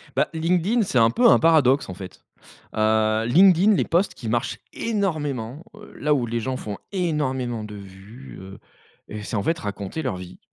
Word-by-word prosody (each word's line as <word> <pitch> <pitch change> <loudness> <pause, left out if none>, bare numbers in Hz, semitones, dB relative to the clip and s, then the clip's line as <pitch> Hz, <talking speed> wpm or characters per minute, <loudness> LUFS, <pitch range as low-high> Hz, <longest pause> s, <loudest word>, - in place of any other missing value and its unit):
Bah - - +2
LinkedIn 180 +8 +1
c'est 160 -10 0
un 115 0 +5
peu 240 - +4
un - - +6
paradoxe, 145 -5 +3
en 95 - -6
fait. 90 0 -11 0.5
Heu, 110 0 +2
LinkedIn 185 - +5
les - - +1
posts 180 +4 0
qui 115 - -7
marchent 120 +3 -1
énormément, 155 - -3
heu, 210 0 -14
là 150 +1 +1
où 125 -4 -1
les 115 0 -2
gens 130 +3 -3
font 105 -4 -6 0.2
énormément 130 - -2
de 105 0 -9
vues, 100 +6 -12
heu, 95 +1 -11 0.6
c'est 110 - -4
en 100 - 0
fait 165 +7 0
raconter 100 +7 -5
leur 130 -10 -2
vie. 90 0 -10
130 Hz, 180 wpm, -23 LUFS, 110-165 Hz, 0.6 s, un